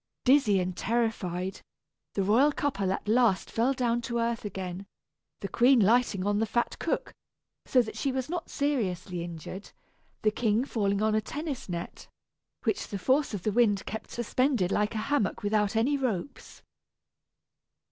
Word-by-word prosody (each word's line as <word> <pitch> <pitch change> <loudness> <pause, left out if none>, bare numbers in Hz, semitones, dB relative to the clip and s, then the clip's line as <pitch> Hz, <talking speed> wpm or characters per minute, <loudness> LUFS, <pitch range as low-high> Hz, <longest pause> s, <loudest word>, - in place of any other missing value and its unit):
Dizzy 250 -7 +5
and 180 0 -2
terrified, 195 -5 -1 0.5
the 195 - +1
royal 240 +10 +4
couple 205 -11 -1
at 195 - -3
last 220 -3 +2
fell 235 +4 +2
down 240 -3 0
to 235 0 -3
earth 230 0 -1
again, 190 -2 -5 0.5
the 195 - -3
queen 250 +5 +4
lighting 215 -2 +3
on 205 0 +1
the 225 - +1
fat 240 +3 -1
cook, - - -2 0.5
so 250 -2 +4
that 220 - -8
she 275 - -1
was 260 -1 -2
not 340 +1 -4
seriously 195 - -1
injured 170 +3 -8 0.5
the 215 - +4
king 225 +2 +1
falling 200 -5 0
on 215 0 +2
a 215 - +2
tennis 290 - -5
net, 170 -1 -6 0.6
which - - -1
the 200 - -4
force 260 +4 +1
of 185 - -6
the 215 - +1
wind 205 -3 +2
kept 220 - -6
suspended 240 -4 0
like 210 +2 0
a 215 0 -2
hammock 220 -10 0
without 210 0 +1
any 245 +6 +2
ropes. 250 -4 -4
220 Hz, 160 wpm, -28 LUFS, 195-250 Hz, 0.6 s, Dizzy